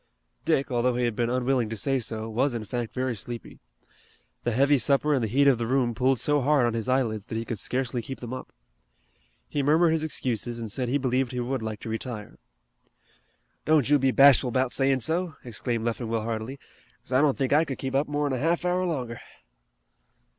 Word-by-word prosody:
Dick, 135 0 +1
although 125 0 +1
he 125 - 0
had 120 -2 -1
been 120 0 0
unwilling 125 -2 +1
to 110 - -4
say 135 +5 +1
so, 110 -2 -4
was 120 +4 0
in 110 -2 -4
fact 120 +2 -4
very 130 -1 -2
sleepy. 115 +2 -7 0.9
The 120 - +1
heavy 140 +4 +3
supper 140 +5 +2
and 130 -4 +1
the - - 0
heat 140 +6 +3
of 130 -4 +4
the 115 - -2
room 125 -2 +1
pulled 130 +1 +1
so 145 +3 +1
hard 140 -1 +3
on 120 - 0
his 115 +2 -3
eyelids 115 -5 0
that 115 - -5
he 115 +1 -2
could 115 -4 -4
scarcely 125 +1 -1
keep 130 +4 -7
them 120 0 -6
up. 130 - -7 1.0
He 145 - -1
murmured 160 +4 +4
his 160 -1 0
excuses 120 -6 -1
and 115 -3 -5
said 125 +2 -2
he 140 - +2
believed 130 -1 0
he 125 - -2
would 125 +1 -2
like 110 -1 -5
to - - -8
retire. 110 -1 -6 1.2
"Don't 150 -3 +3
you 145 - +6
be 135 0 +2
bashful 135 0 +6
about 130 +1 0
sayin' 135 0 +2
so," 165 +3 -1
exclaimed 115 0 -2
Leffingwell 115 -1 -2
heartily, 115 +4 -4 0.5
"'cause - - -12
I 130 - +5
don't 145 -3 +2
think 135 -1 0
I 155 +2 +5
could 135 -5 -5
keep 135 -1 -4
up 140 +2 +1
more'n 145 -1 -1
a 130 - -1
half 170 +5 0
hour 180 +1 +1
longer." 125 -8 -4
130 Hz, 210 wpm, -26 LUFS, 115-140 Hz, 1.2 s, you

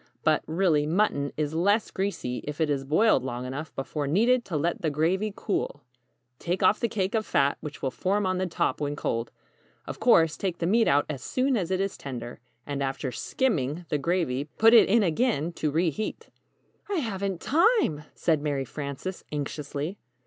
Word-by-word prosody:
But, - - +3
really, 160 -3 +2
mutton 155 -5 +1
is 150 0 -1
less 200 +6 +2
greasy 190 -11 -3
if 150 +1 -5
it 155 -2 +2
is 140 -1 -1
boiled 155 - +3
long 125 -1 -4
enough 140 +4 -5
before 140 +2 -3
needed 235 - +3
to 165 - -2
let 170 +4 -1
the 160 - +1
gravy 175 +8 0
cool. 145 -7 -3 0.6
Take 175 +2 -2
off 210 - +4
the 235 - 0
cake 195 -2 -1
of 220 -1 +1
fat 140 -7 +1
which 150 -2 -8
will 135 - 0
form 200 +7 0
on 185 0 0
the 185 - 0
top 170 - -1
when 145 0 -1
cold. 115 -5 -2 0.6
Of - - -7
course, 160 -2 +4
take 185 -3 -2
the 170 - -2
meat 225 +6 +3
out 145 +1 +3
as 140 -4 -5
soon 260 - 0
as 185 -6 -1
it 185 -1 0
is 195 0 -2
tender, 120 -4 -7 0.3
and 140 -1 -3
after 135 -1 -2
'skimming' 165 - -1
the 150 - 0
gravy, 145 -4 0
put 225 +1 +6
it 230 - +7
in 225 +2 +4
again 175 - +1
to 155 - -1
re 165 +3 +1
heat." 215 - -5 0.6
"I 405 - -1
haven't 200 - -2
time!" 335 - +3
said 160 -3 +1
Mary 145 -3 -1
Frances, 145 +7 -6
anxiously. 150 +4 -4
165 Hz, 190 wpm, -27 LUFS, 145-200 Hz, 0.6 s, it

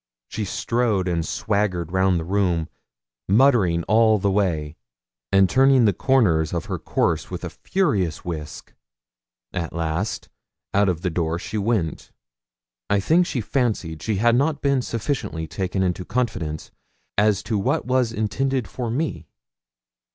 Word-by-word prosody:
She 110 - -3
strode 110 -2 0
and 85 -2 0
swaggered 90 -3 -1
round 95 -1 +2
the - - -4
room, 90 -4 0 0.6
muttering 100 -7 +4
all 110 +2 +4
the 100 0 0
way, 80 -7 0 0.6
and 95 -1 +5
turning 130 +1 +4
the 105 - +4
corners 90 - +2
of 85 - -2
her - - -4
course - - 0
with - - -6
a - - -5
furious 105 - -1
whisk. 75 -4 -6 0.8
At 85 -3 -3
last, 85 +5 -2 0.5
out 100 0 +3
of 85 -3 -2
the 90 -2 -1
door 80 0 -1
she 105 +4 -4
went. 100 -7 -1 0.8
I 100 - +3
think 170 - +3
she 125 - -2
fancied 105 - -1
she 110 - -1
had 115 +4 +3
not 145 +3 +1
been 140 -2 +2
sufficiently 115 - -3
taken 95 +3 -2
into 90 0 -1
confidence 90 -9 -3 0.4
as 105 -1 +2
to 105 0 -1
what 135 +10 0
was 125 -2 +1
intended 115 +3 -1
for 120 -2 -4
me. 145 +7 -3
100 Hz, 145 wpm, -23 LUFS, 85-120 Hz, 0.8 s, and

